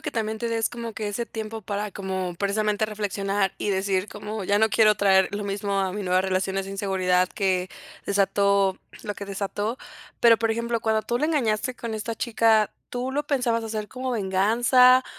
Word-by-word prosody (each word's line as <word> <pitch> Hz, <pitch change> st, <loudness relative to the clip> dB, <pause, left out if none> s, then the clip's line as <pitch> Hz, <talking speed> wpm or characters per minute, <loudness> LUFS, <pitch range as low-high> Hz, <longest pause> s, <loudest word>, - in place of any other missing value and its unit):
que -, -, -4 dB
también 220 Hz, -1 st, -2 dB
te 235 Hz, -, -2 dB
des 225 Hz, -1 st, 0 dB
como 235 Hz, -2 st, -6 dB
que 215 Hz, -1 st, -3 dB
ese 230 Hz, +3 st, -3 dB
tiempo 220 Hz, 0 st, -6 dB
para 205 Hz, 0 st, -3 dB
como, 190 Hz, -2 st, -4 dB
precisamente 210 Hz, +2 st, 0 dB
reflexionar 200 Hz, -2 st, -1 dB
y -, -, -2 dB
decir 190 Hz, 0 st, 0 dB
como: 210 Hz, +1 st, -6 dB
"Ya 200 Hz, +2 st, +2 dB
no 220 Hz, +1 st, +3 dB
quiero 215 Hz, -1 st, +5 dB
traer 190 Hz, -2 st, +4 dB
lo 205 Hz, -, -3 dB
mismo 200 Hz, 0 st, -1 dB
a 190 Hz, -1 st, -1 dB
mi 205 Hz, +1 st, -4 dB
nueva 185 Hz, 0 st, +2 dB
relaciones 190 Hz, 0 st, -1 dB
de 195 Hz, -, -8 dB
inseguridad 185 Hz, -2 st, +1 dB
que 185 Hz, -2 st, 0 dB, 0.4 s
desató 200 Hz, -1 st, +2 dB, 0.2 s
lo 205 Hz, -, -4 dB
que 200 Hz, -, -7 dB
desató". 205 Hz, +3 st, -3 dB, 0.4 s
Pero, 230 Hz, -1 st, +6 dB
por 225 Hz, -1 st, +1 dB
ejemplo, 235 Hz, +1 st, -1 dB
cuando 220 Hz, 0 st, +1 dB
tú 235 Hz, +3 st, -1 dB
la 305 Hz, -, +1 dB
engañaste 255 Hz, -6 st, 0 dB
con 235 Hz, -1 st, -5 dB
esta 220 Hz, +1 st, -3 dB
chica, 225 Hz, -2 st, +2 dB, 0.2 s
¿tú 250 Hz, +2 st, -3 dB
lo 295 Hz, +1 st, -2 dB
pensabas 245 Hz, -5 st, +1 dB
hacer 215 Hz, -1 st, -4 dB
como 255 Hz, 0 st, -4 dB
venganza, 240 Hz, +5 st, +4 dB
210 Hz, 190 wpm, -25 LUFS, 195-230 Hz, 0.4 s, Pero